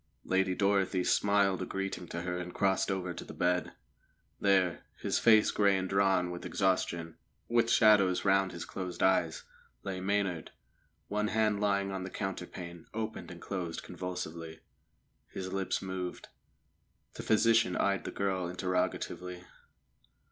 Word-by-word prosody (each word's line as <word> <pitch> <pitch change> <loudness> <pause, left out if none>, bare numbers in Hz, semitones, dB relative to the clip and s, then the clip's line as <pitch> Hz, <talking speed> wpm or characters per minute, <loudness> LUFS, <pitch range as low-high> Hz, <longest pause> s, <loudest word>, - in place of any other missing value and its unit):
Lady 95 0 +1
Dorothy 100 -2 +2
smiled 100 0 +2
a - - -1
greeting 95 -2 -4
to 85 +1 -5
her 90 0 -2
and 90 0 -7
crossed 95 -1 +2
over 95 -2 -2
to - - -7
the - - -10
bed. 90 0 0 0.7
There, 95 -4 +2 0.2
his - - 0
face 110 -2 +6
grey 100 -2 +3
and 95 0 -2
drawn 95 -2 +2
with 85 - -6
exhaustion, 85 -4 0 0.3
with 115 -1 +2
shadows 105 -6 +5
round 95 -1 +3
his 85 - -6
closed 90 -2 -4
eyes, 90 -4 +2 0.4
lay 95 -2 -4
Maynard; 95 -4 -1 0.5
one 105 +1 0
hand 105 -1 +1
lying 100 -1 +1
on 95 -1 -3
the 95 - -5
counterpane 90 -3 -6
opened 110 0 -4
and 85 -2 -9
closed 90 -3 -4
convulsively, 85 -3 -6 0.7
his 95 0 -6
lips 95 0 -1
moved. 95 -1 -5 0.8
The - - -7
physician 110 -4 +3
eyed 100 -1 +1
the - - -4
girl 95 -2 -1
interrogatively. 90 0 -2
95 Hz, 140 wpm, -31 LUFS, 90-100 Hz, 0.8 s, face